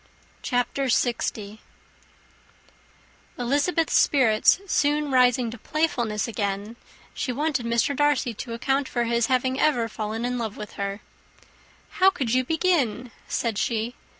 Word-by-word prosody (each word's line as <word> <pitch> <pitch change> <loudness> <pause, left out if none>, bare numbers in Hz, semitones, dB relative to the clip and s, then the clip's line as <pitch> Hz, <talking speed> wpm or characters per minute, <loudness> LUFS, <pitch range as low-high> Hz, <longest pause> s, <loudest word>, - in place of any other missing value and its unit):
_]] - - -33 0.4
CHAPTER 245 +2 -1
LX. 225 -4 -1 1.8
Elizabeth's 290 +7 +1
spirits 240 0 +4
soon 295 -5 +1
rising 250 -2 +3
to 235 - -9
playfulness 240 -8 -1
again, 205 0 -3 0.4
she 255 - -3
wanted 280 -2 -1
Mr. 235 +4 +1
Darcy 290 -4 +1
to 230 +2 -7
account 270 +3 0
for 240 - 0
his 235 0 +1
having 260 +1 0
ever 245 -7 +2
fallen 220 +1 -4
in 250 0 -2
love 220 -3 -4
with 210 - -7
her. 200 0 -4 1.0
"How 375 +1 +7
could 265 -11 -2
you 255 0 +3
begin?" 265 - 0 0.2
said 225 -3 -1
she. 230 +1 -1
245 Hz, 130 wpm, -25 LUFS, 225-280 Hz, 1.8 s, How